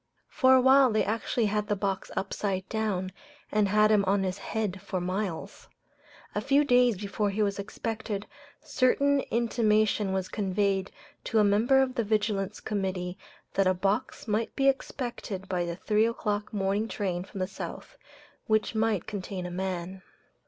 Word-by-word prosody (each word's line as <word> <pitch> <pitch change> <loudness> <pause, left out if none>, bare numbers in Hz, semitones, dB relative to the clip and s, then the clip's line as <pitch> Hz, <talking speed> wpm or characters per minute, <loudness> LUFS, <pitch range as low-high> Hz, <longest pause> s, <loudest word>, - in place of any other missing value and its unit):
For 260 -3 +5
a 260 - +6
while 265 0 +6
they 215 - +2
actually 225 +2 0
had 210 0 0
the 205 - +1
box 195 -1 -2
upside 190 -1 -2
down, 205 -4 -1 0.4
and 210 -1 +3
had 210 +2 +4
him 210 -2 +4
on 195 +1 +2
his 185 0 -2
head 205 -4 -3
for 200 -2 -3
miles. 185 -1 -4 0.7
A 210 - -1
few 275 +4 +3
days 245 -5 +4
before 205 +1 -1
he 210 +2 0
was 200 -1 -1
expected, 210 0 -4 0.4
certain 280 -1 +2
intimation 215 -3 +2
was 190 -1 -1
conveyed 195 -1 0 0.4
to 225 - 0
a 215 - +6
member 230 +7 +4
of 255 -1 -3
the 235 - 0
Vigilance 210 -2 -1
Committee 185 -3 -3 0.4
that 195 -1 +2
a 185 - +3
box 205 +8 -1
might 215 +1 -1
be 275 -1 +2
expected 240 -7 -2
by 180 -2 -1
the 170 0 -4
three 215 +4 +2
o'clock 210 -2 -2
morning 200 +1 0
train 185 -5 -2
from 195 - -9
the 185 - +1
South, - - -8 0.5
which 215 0 +1
might 220 -4 +1
contain 190 -3 -5
a 180 - -5
man. 185 0 -4
210 Hz, 165 wpm, -28 LUFS, 190-225 Hz, 0.7 s, a